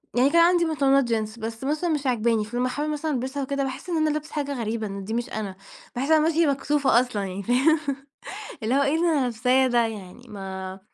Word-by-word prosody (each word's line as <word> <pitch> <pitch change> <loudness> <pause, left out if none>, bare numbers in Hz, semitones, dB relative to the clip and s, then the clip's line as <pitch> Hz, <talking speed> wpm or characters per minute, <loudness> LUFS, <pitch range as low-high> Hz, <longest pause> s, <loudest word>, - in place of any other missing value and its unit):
يعني 255 +3 +4
كان 335 +3 +5
عندي 345 0 +4
بنطلونات 275 -3 +3
جينز، 220 -2 -2
بس 225 +1 -6
مثلًا 305 +5 -1
مش 295 -4 -1
عاجباني، 230 -3 +1
فلما 245 +3 -1
أحاول 295 +4 -2
مثلًا 305 +1 -2
ألبسها 265 +1 -2
وكده، 275 +1 -1
باحس 265 +6 -5
إن 340 - 0
أنا 310 0 +2
لابسة 305 +1 -4
حاجة 285 -2 -2
غريبة، 220 -1 -2
إن 195 0 -6
دي 215 +3 -5
مش 240 +1 -2
أنا، 205 -3 -4 0.4
باحس 255 +3 -1
إن 320 - +6
أنا 310 - +4
ماشية 330 0 +3
مكسوفة 280 -3 +2
أصلًا، 245 -5 -2
يعني 195 +1 -5
فاهم؟ 270 +8 +3 0.8
اللي 230 +4 +1
هو 280 - +4
إيه 280 +2 +2
اللي 340 +2 +2
أنا 310 -4 +2
لابساه 250 +2 +2
ده! 240 -2 +3
يعني 210 +2 -9
ما 190 -2 -6
م - - -16
260 Hz, 230 wpm, -25 LUFS, 225-295 Hz, 0.8 s, إن